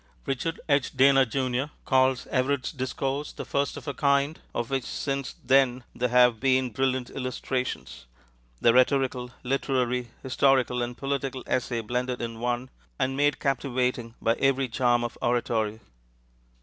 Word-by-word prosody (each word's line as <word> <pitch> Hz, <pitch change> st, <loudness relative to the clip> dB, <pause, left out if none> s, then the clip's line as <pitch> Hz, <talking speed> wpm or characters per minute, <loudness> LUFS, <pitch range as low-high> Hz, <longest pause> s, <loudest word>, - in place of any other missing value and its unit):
Richard 160 Hz, +5 st, -2 dB
H. 140 Hz, -2 st, +1 dB
Dana, 135 Hz, 0 st, +6 dB
Jr., 130 Hz, +1 st, -1 dB, 0.2 s
calls 130 Hz, -1 st, +3 dB
Everett's 130 Hz, 0 st, 0 dB
discourse 135 Hz, +1 st, -3 dB
the -, -, -7 dB
first 140 Hz, 0 st, -1 dB
of -, -, -10 dB
a 140 Hz, -, -2 dB
kind 140 Hz, +3 st, +1 dB, 0.2 s
of 120 Hz, +2 st, -2 dB
which 135 Hz, -2 st, 0 dB
since 140 Hz, -1 st, -3 dB
then 130 Hz, -1 st, +3 dB
there 125 Hz, 0 st, -1 dB
have 125 Hz, -2 st, +5 dB
been 130 Hz, -1 st, +2 dB
brilliant 130 Hz, +1 st, -1 dB
illustrations, 125 Hz, -, -4 dB, 0.5 s
the 115 Hz, -, +5 dB
rhetorical, 130 Hz, -1 st, +2 dB
literary, 125 Hz, -2 st, 0 dB
historical, 130 Hz, -2 st, +2 dB
and 120 Hz, 0 st, -4 dB
political 135 Hz, -1 st, -3 dB
essay 120 Hz, -2 st, -1 dB
blended 125 Hz, +2 st, -2 dB
in 115 Hz, -1 st, -5 dB
one, 120 Hz, +1 st, -2 dB, 0.3 s
and 135 Hz, +1 st, 0 dB
made 145 Hz, 0 st, +2 dB
captivating 125 Hz, -3 st, -1 dB
by 115 Hz, -, +2 dB
every 135 Hz, -1 st, +2 dB
charm 120 Hz, 0 st, +2 dB
of 120 Hz, -, -5 dB
oratory. 115 Hz, -3 st, 0 dB
130 Hz, 140 wpm, -27 LUFS, 125-135 Hz, 0.5 s, Dana